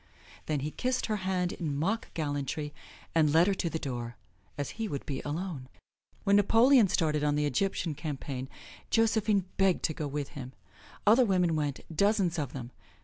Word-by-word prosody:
Then 150 -3 0
he 150 +2 -3
kissed 255 +6 -1
her 215 -2 -1
hand 185 -2 -1
in 150 -5 -3
mock 200 +10 -1
gallantry 150 -1 -2 0.4
and 155 -3 +4
led 165 +3 +6
her 200 - +2
to 180 -3 -1
the 160 - -2
door, 120 -5 -4 0.4
as 145 -2 -3
he 225 -1 -3
would 140 -7 -4
be 135 -2 -3
alone. 150 -3 -4 0.5
When 200 0 +5
Napoleon 230 +3 +6
started 155 -5 +1
on 145 -1 +2
the 150 0 +1
Egyptian 170 +3 0
campaign, 140 -3 -5 0.4
Josephine 220 -3 +2
begged 195 -2 +3
to 155 - +1
go 150 -1 -3
with 145 0 -3
him; 130 -2 -8 0.5
other 225 +5 +6
women 180 -6 +2
went, 145 -3 -1
dozens 195 -2 +2
of 145 -4 -3
them. 125 -2 -7
160 Hz, 175 wpm, -30 LUFS, 145-195 Hz, 0.5 s, led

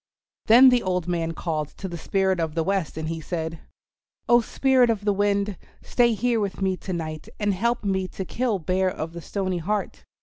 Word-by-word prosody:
Then 245 +4 +9
the 250 -1 +3
old 180 -2 -1
man 165 -2 -1
called 155 -3 -2
to 195 - -5
the 175 - -6
Spirit 190 +2 0
of 160 -2 -2
the 165 - +1
Wind, 190 -2 -1
and 160 0 -4
he 165 0 -4
said, 160 0 -4 0.7
"Oh, 240 0 +6
Spirit 260 +1 +3
of 210 -3 -1
the 205 - +3
Wind, 200 -1 0 0.3
stay 240 -2 +2
here 235 +2 +1
with 200 -3 -3
me 190 -1 +1
to 190 - -7
night 155 -3 -5
and 205 -1 +1
help 235 +5 0
me 190 -2 0
to 190 - -6
kill 235 +1 -1
Bear 185 +2 0
of 165 -3 -5
the 170 - -7
Stony 185 -1 -2
Heart. 205 +4 -3
190 Hz, 205 wpm, -24 LUFS, 170-210 Hz, 0.7 s, Then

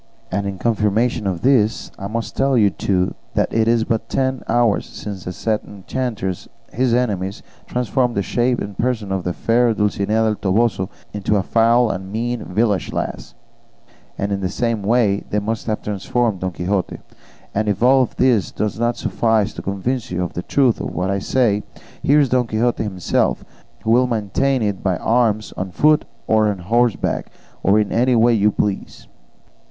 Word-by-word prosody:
And 100 +2 -1
in 100 -1 -4
confirmation 110 0 +1
of 90 -3 -2
this, 120 -4 +2
I 100 - -4
must 115 +2 -4
tell 135 -1 +2
you, 105 -3 +4
too, 90 -1 0 0.2
that - - +1
it 110 0 +2
is 115 -1 +3
but 115 0 -2
ten 130 -1 0
hours 120 -3 +2
since 100 -4 -7
these 90 - -5
said 110 +1 0
enchanters 100 -2 -4 0.2
his 125 +1 +1
enemies 105 -5 -1 0.2
transformed 125 0 0
the 100 - 0
shape 120 +4 +1
and 100 -1 -5
person 115 -3 -1
of 95 -2 -1
the 90 - -1
fair 115 +4 +2
Dulcinea 105 +1 +1
del 110 -1 +1
Toboso 100 -1 +1 0.2
into 105 +1 0
a 100 - +2
foul 115 +3 +3
and 95 0 -6
mean 120 +2 -2
village 105 +1 0
lass, - - -4 0.8
and 100 +1 -2
in 100 0 -1
the 95 - -1
same 115 +1 -1
way 105 -1 +2
they 105 - -1
must 110 +2 -2
have 110 -1 -2
transformed 105 +1 -1
Don 95 - -1
Quixote; 95 +2 -2 0.6
and 110 +1 0
if 105 +3 -1
all 130 0 +5
this 120 -9 +3
does 105 +1 -3
not 120 +1 0
suffice 110 -2 +1
to - - -7
convince 110 +6 -2
you 90 0 -1
of 90 - -4
the 90 - -3
truth 130 +3 +2
of - - -5
what 95 +2 0
I 100 - 0
say, 105 -1 +1 0.4
here 145 +2 +4
is 140 -3 +3
Don 125 -1 +2
Quixote 115 +2 0
himself, 95 -5 0 0.4
who 110 - +1
will 125 +2 +4
maintain 120 +3 0
it 100 -2 -1
by 95 -3 0
arms, 110 -1 +1
on 95 +1 -4
foot 150 +10 +3 0.2
or 110 -1 +3
on 105 -2 -1
horseback 115 +6 0 0.3
or 100 +3 +4
in 105 -1 0
any 125 +2 +3
way 120 +1 +5
you 105 -1 +3
please." 100 -1 -3
110 Hz, 180 wpm, -20 LUFS, 100-120 Hz, 0.8 s, all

